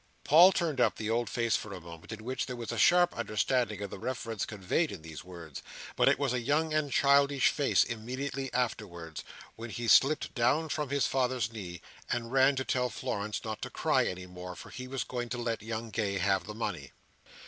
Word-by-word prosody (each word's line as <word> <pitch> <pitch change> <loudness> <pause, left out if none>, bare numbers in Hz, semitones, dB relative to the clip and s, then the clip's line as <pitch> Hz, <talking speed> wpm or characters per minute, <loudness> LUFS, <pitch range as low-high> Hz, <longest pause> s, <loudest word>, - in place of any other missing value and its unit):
Paul 170 +6 +8
turned 160 -8 0
up 115 -3 +3
the 110 0 -3
old 115 -1 0
face 115 -2 +1
for 105 - -4
a - - -7
moment, 85 +1 -11
in 110 0 -7
which 130 +3 -3
there 125 - -4
was 120 -2 -5
a - - -3
sharp 175 0 +5
understanding 110 0 0
of 100 - -6
the - - -7
reference 115 -2 -3
conveyed 105 - 0
in 80 - -8
these 80 -1 -8
words: 85 -5 -9 0.3
but - - +3
it - - +3
was 135 -2 0
a 125 - +1
young 155 +6 +1
and 155 -2 0
childish 140 0 +4
face 145 -2 +3
immediately 130 +4 -4
afterwards, 90 -10 -3 0.3
when 115 +1 -7
he 115 +3 -4
slipped 140 +6 +4
down 145 +5 +2
from 150 -2 -2
his 140 -2 +1
father's 125 -4 0
knee, 90 -5 -7 0.3
and 115 0 -2
ran 135 +1 +5
to 130 0 -2
tell 125 -1 +1
Florence 105 -1 -3
not 110 -1 -4
to - - -4
cry - - +1
any 90 0 -5
more, 90 0 -8
for - - -11
he 125 0 -7
was 135 0 -2
going 120 -1 -4
to 120 - -3
let 115 -2 -2
young 110 +1 -5
Gay 100 -3 -1
have 95 +1 +1
the 105 - -6
money. 115 - -4
115 Hz, 215 wpm, -30 LUFS, 105-135 Hz, 0.3 s, Paul